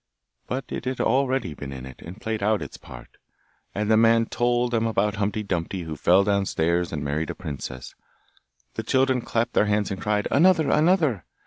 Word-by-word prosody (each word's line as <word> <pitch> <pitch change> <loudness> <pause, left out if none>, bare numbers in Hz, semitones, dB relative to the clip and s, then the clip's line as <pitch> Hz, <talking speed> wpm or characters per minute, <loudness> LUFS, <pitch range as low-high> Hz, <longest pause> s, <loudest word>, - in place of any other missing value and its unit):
But 130 +2 -3
it - - -5
had 130 0 -3
already 130 - +1
been 70 -2 -8
in 65 -1 -7
it, 65 -1 -12
and 90 +5 -10
played 110 -1 -3
out 105 +1 +1
its - - -9
part. - - -13 0.6
And 105 +1 0
the - - +6
man 115 0 +4
told 120 +1 0
them 115 -1 +1
about 105 -1 0
Humpty 105 +1 -1
Dumpty 90 -1 -3
who 80 -1 -5
fell 90 +6 +4
downstairs 90 -4 0
and 75 -3 -3
married 75 +3 -2
a - - -4
princess. 70 -7 -7 0.8
The - - -3
children 130 +2 +2
clapped 115 +1 -1
their - - +3
hands 105 -1 0
and 95 - -4
cried, 105 -1 0
'Another! 165 -1 +4
another! 155 - +2
105 Hz, 190 wpm, -24 LUFS, 90-120 Hz, 0.8 s, the